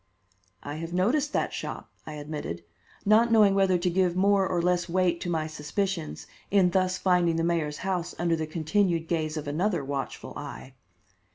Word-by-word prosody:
"I 145 Hz, +1 st, -5 dB
have 165 Hz, +2 st, -6 dB
noticed 265 Hz, +12 st, +1 dB
that -, -, 0 dB
shop," -, -, -6 dB, 0.2 s
I 155 Hz, -, -6 dB
admitted, 145 Hz, -, -5 dB, 0.4 s
not 220 Hz, +3 st, +5 dB
knowing 210 Hz, -3 st, +6 dB
whether 195 Hz, -2 st, +3 dB
to 175 Hz, +1 st, -2 dB
give 180 Hz, 0 st, +2 dB
more 195 Hz, 0 st, +3 dB
or 175 Hz, -, 0 dB
less 175 Hz, 0 st, +1 dB
weight 175 Hz, -1 st, +1 dB
to 175 Hz, -, -3 dB
my 160 Hz, -2 st, 0 dB
suspicions 160 Hz, +2 st, -3 dB, 0.2 s
in 190 Hz, -3 st, +4 dB
thus 185 Hz, 0 st, +1 dB
finding 180 Hz, -3 st, +2 dB
the 165 Hz, -, 0 dB
mayor's 165 Hz, -3 st, 0 dB
house 180 Hz, -3 st, -2 dB
under 170 Hz, 0 st, +1 dB
the 160 Hz, -1 st, -3 dB
continued 165 Hz, +1 st, 0 dB
gaze 160 Hz, -2 st, -1 dB
of 150 Hz, -1 st, -5 dB
another 170 Hz, +1 st, 0 dB
watchful 135 Hz, -1 st, -5 dB
eye. 130 Hz, -, -8 dB
175 Hz, 175 wpm, -27 LUFS, 155-190 Hz, 0.4 s, knowing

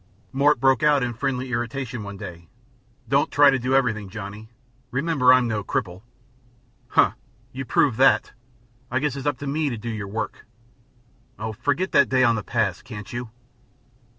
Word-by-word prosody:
Mort 140 Hz, +1 st, +3 dB
broke 135 Hz, +2 st, +3 dB
out 150 Hz, -3 st, +4 dB
in 120 Hz, -1 st, -2 dB
friendly 130 Hz, +1 st, -3 dB
irritation 120 Hz, +1 st, -3 dB
one 100 Hz, -1 st, -7 dB
day: 85 Hz, -5 st, -9 dB, 0.6 s
"Don't 135 Hz, +4 st, +2 dB
try 145 Hz, -1 st, +6 dB
to 135 Hz, -, 0 dB
do 130 Hz, +2 st, 0 dB
everything, 110 Hz, -7 st, +1 dB
Johnny. 105 Hz, +1 st, -8 dB, 0.4 s
Remember 135 Hz, -1 st, +3 dB
I'm 130 Hz, -1 st, +5 dB
no 110 Hz, -3 st, -2 dB
cripple." 95 Hz, -5 st, -3 dB, 0.9 s
"Humph! -, -, +3 dB, 0.4 s
You 135 Hz, +1 st, -6 dB
proved 125 Hz, -2 st, +2 dB
that. 105 Hz, -, +4 dB, 0.6 s
I 125 Hz, -, -1 dB
guess 140 Hz, 0 st, 0 dB
it's 140 Hz, +1 st, -5 dB
up 145 Hz, -3 st, 0 dB
to 145 Hz, -, -7 dB
me 145 Hz, +2 st, 0 dB
to 120 Hz, -, -4 dB
do 115 Hz, +2 st, -6 dB
your 110 Hz, -3 st, -4 dB
work." 110 Hz, +3 st, -5 dB, 0.9 s
"Oh, 110 Hz, +1 st, -4 dB
forget 145 Hz, -, -1 dB
that 140 Hz, -, +4 dB
day 130 Hz, -1 st, +3 dB
on 120 Hz, -2 st, +5 dB
the 110 Hz, -, -2 dB
pass, 105 Hz, -5 st, -1 dB
can't 110 Hz, -1 st, -9 dB
you?" 120 Hz, -1 st, -5 dB
125 Hz, 175 wpm, -24 LUFS, 110-135 Hz, 0.9 s, try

